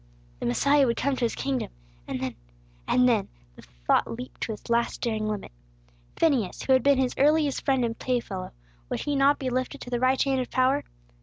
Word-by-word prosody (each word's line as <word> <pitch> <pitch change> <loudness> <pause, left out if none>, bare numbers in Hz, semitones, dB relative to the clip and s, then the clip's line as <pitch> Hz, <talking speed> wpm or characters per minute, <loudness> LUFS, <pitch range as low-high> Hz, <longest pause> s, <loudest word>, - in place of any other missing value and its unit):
The - - -2
Messiah 280 - +3
would 235 - 0
come 280 -1 0
to 255 - 0
His 230 - -2
kingdom, 270 -2 -2 0.4
and 130 - -3
then 130 -1 -3 0.5
and 250 0 +4
then 225 -5 +2 0.3
the - - -13 0.2
thought - - +3
leaped 250 +2 -8
to - - -2
its 210 - -11
last 235 0 0
daring 220 -2 -1
limit. 210 -1 -4 0.6
Phineas, 265 - +1
who 265 - +3
had 260 - +5
been 280 +2 +4
His 260 -1 +1
earliest 295 0 +3
friend 265 -3 +2
and 230 -1 -4
playfellow, 230 -7 -2 0.4
would - - -2
he 290 - -1
not 275 +1 +4
be 260 -2 -3
lifted 255 +1 -2
to 245 - -8
the 240 - 0
right 255 +1 +2
hand 270 -1 +1
of 250 - -5
power? 260 +2 +2
255 Hz, 210 wpm, -26 LUFS, 230-275 Hz, 0.6 s, had